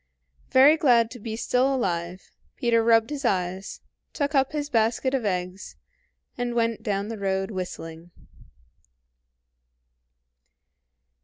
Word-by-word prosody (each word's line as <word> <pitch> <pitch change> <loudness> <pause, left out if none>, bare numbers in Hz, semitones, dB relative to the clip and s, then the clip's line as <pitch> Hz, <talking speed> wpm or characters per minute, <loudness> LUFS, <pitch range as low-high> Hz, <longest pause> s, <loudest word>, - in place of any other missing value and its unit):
Very 280 +4 +6
glad 240 -7 +3
to 245 - -9
be 220 0 -5
still 255 +4 +1
alive, 175 -5 -3 0.2
Peter 230 -2 +2
rubbed 225 +3 +3
his 290 -1 -4
eyes, 190 -3 -2 0.3
took 285 0 -2
up 270 -2 +2
his 295 -1 -3
basket 235 +1 +1
of 260 -5 -1
eggs, 185 0 -3 0.6
and 240 -1 -2
went 230 -1 0
down 200 -1 -2
the 225 -2 -6
road 195 +1 -1
whistling. 170 -3 -7
225 Hz, 120 wpm, -25 LUFS, 190-260 Hz, 0.6 s, Very